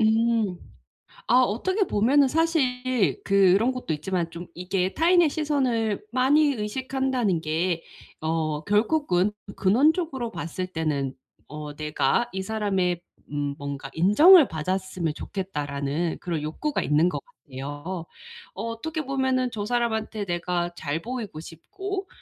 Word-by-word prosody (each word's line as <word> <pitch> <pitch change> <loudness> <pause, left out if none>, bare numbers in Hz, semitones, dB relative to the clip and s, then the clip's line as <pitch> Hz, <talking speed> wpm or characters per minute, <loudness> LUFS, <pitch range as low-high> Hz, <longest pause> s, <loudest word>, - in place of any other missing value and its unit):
음. 220 -3 +2 0.7
아 250 +1 +6
어떻게 375 - +1
보면은 270 +7 +4
사실 255 - +1
그런 200 +4 +4
것도 250 -11 -3
있지만 170 +2 -2
좀 170 +1 -8
이게 185 +1 -1
타인의 340 -1 +4
시선을 255 - 0
많이 285 +4 +4
의식한다는 250 -3 -1
게 165 +2 -1 0.4
어 155 -1 -1
결국은 210 - +2 0.3
근원적으로 265 - +2
봤을 180 +1 -4
때는 150 -6 -2 0.3
어 150 0 -7
'내가 155 +10 0
이 190 0 -3
사람의 190 -5 0 0.3
음 145 -1 -2
뭔가 140 -1 -5
인정을 290 - +7
받았으면 185 0 -2
좋겠다.'라는 150 -4 -3
그런 165 -4 -2
욕구가 275 - -2
있는 155 +4 +3
것 - - -3
같아요. 145 - -7 0.5
어 200 - -5
어떻게 230 +8 -3
보면은 260 -2 +1
'저 210 -3 -4
사람한테 220 -2 -1
내가 175 -1 -1
잘 145 +3 -3
보이고 230 -7 -5
싶고 385 - -6
205 Hz, 270 characters per minute, -25 LUFS, 165-255 Hz, 0.7 s, 인정을